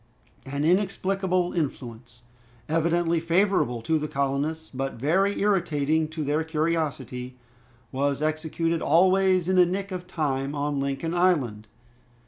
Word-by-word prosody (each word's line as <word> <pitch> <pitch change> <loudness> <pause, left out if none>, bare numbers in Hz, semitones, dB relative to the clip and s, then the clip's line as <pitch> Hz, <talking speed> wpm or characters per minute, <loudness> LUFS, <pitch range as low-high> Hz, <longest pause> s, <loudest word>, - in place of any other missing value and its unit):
An 140 +2 -2
inexplicable 185 0 +1
influence, 120 -6 -5 0.4
evidently 165 +1 +1
favorable 165 - +1
to 160 +5 +1
the 150 - -3
colonists, 140 +3 -2
but 135 +1 -3
very 185 - +1
irritating 160 -6 +1
to 155 0 -5
their 150 +2 0
curiosity, 150 -6 -2 0.5
was 140 +1 0
executed 160 +2 -1
always 185 +2 +3
in 185 0 +2
the 180 - +7
nick 195 +2 -3
of 180 -1 -5
time 140 -4 -2
on 145 0 -1
Lincoln 140 +4 -2
Island. 140 -13 +1
160 Hz, 120 wpm, -25 LUFS, 140-180 Hz, 0.5 s, the